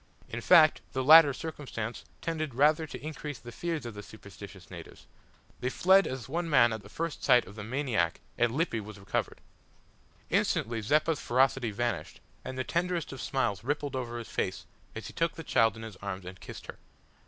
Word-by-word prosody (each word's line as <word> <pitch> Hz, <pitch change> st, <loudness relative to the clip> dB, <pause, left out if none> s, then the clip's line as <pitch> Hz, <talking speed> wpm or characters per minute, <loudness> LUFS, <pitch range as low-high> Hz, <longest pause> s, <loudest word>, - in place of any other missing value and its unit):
In -, -, -5 dB
fact -, -, +6 dB
the 130 Hz, -, -1 dB
latter 155 Hz, +1 st, +9 dB
circumstance 130 Hz, -6 st, -6 dB, 0.2 s
tended 155 Hz, -5 st, -3 dB
rather 150 Hz, +4 st, +3 dB
to 150 Hz, -, -8 dB
increase 150 Hz, -3 st, -5 dB
the 120 Hz, -, -11 dB
fears 165 Hz, 0 st, -3 dB
of 120 Hz, -, -6 dB
the 105 Hz, -, -8 dB
superstitious 100 Hz, -, -12 dB
natives. -, -, -11 dB, 0.5 s
They 125 Hz, -, -1 dB
fled 190 Hz, +7 st, +4 dB
as 130 Hz, -2 st, -5 dB
one 165 Hz, +4 st, -2 dB
man 120 Hz, -6 st, +5 dB
at 110 Hz, -, -5 dB
the 100 Hz, -, -14 dB
first 165 Hz, +6 st, -4 dB
sight 125 Hz, -1 st, +5 dB
of 95 Hz, -, -12 dB
the 105 Hz, 0 st, -7 dB
maniac 120 Hz, -, -1 dB, 0.2 s
and 120 Hz, -1 st, +2 dB
Lippy 145 Hz, -3 st, 0 dB
was 105 Hz, -1 st, -9 dB
recovered! 95 Hz, -, -3 dB, 0.9 s
Instantly 115 Hz, 0 st, +1 dB
Zeppa's 150 Hz, +7 st, +2 dB
ferocity 130 Hz, -1 st, +2 dB
vanished, 120 Hz, +3 st, -3 dB, 0.2 s
and 130 Hz, 0 st, -6 dB
the 130 Hz, -, -1 dB
tenderest 175 Hz, +2 st, -1 dB
of 135 Hz, -, -7 dB
smiles 115 Hz, -8 st, -1 dB
rippled 145 Hz, +1 st, -2 dB
over 120 Hz, -2 st, -4 dB
his 115 Hz, -, -7 dB
face 95 Hz, -2 st, -3 dB, 0.3 s
as -, -, -6 dB
he -, -, -8 dB
took 165 Hz, 0 st, 0 dB
the 165 Hz, -, -7 dB
child 115 Hz, -7 st, +3 dB
in 115 Hz, -, -8 dB
his 110 Hz, -4 st, -9 dB
arms 95 Hz, -2 st, -6 dB
and 90 Hz, +1 st, -9 dB
kissed -, -, -9 dB
her. -, -, -10 dB
130 Hz, 190 wpm, -29 LUFS, 110-155 Hz, 0.9 s, latter